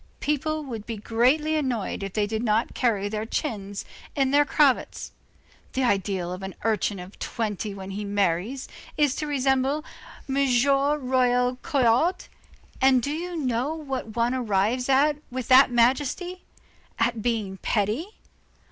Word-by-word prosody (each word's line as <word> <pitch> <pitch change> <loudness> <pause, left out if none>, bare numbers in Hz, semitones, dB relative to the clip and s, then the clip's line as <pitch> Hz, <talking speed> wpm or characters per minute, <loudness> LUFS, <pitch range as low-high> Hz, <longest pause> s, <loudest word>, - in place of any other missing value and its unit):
People 305 +1 -1
would 230 -6 -7
be 230 -2 -4
greatly 255 +9 +2
annoyed 255 -11 -2
if 195 -1 -5
they 210 -1 +1
did 220 +1 -3
not 225 0 +1
carry 210 -5 +1
their 215 +1 -3
chins 205 -7 -3 0.3
in 270 -2 +2
their 290 +1 +5
cravats. 285 -2 +1 0.6
The 265 - 0
ideal 195 -5 0
of 185 - -7
an 190 0 -6
urchin 215 -2 0
of 180 +2 -10
twenty 210 -3 -3
when 190 0 -7
he 205 +2 -4
marries, 200 +5 -1 0.3
is 290 -3 +3
to 305 - -3
resemble 270 +1 +1 0.4
M. 270 0 -2 0.3
Royer 255 -3 +2
Collard. 280 +5 +2 0.6
And 260 -2 +5
do 285 - -1
you 345 +3 -4
know 260 +1 -1
what 265 -8 -5
one 235 +1 +1
arrives 235 +1 0
at 285 +2 +4
with 255 -1 -5
that 260 +1 +8
majesty? 275 +9 +1 0.5
at 230 -1 0
being 215 -5 -1
petty. 215 - -1
245 Hz, 145 wpm, -25 LUFS, 210-280 Hz, 0.6 s, that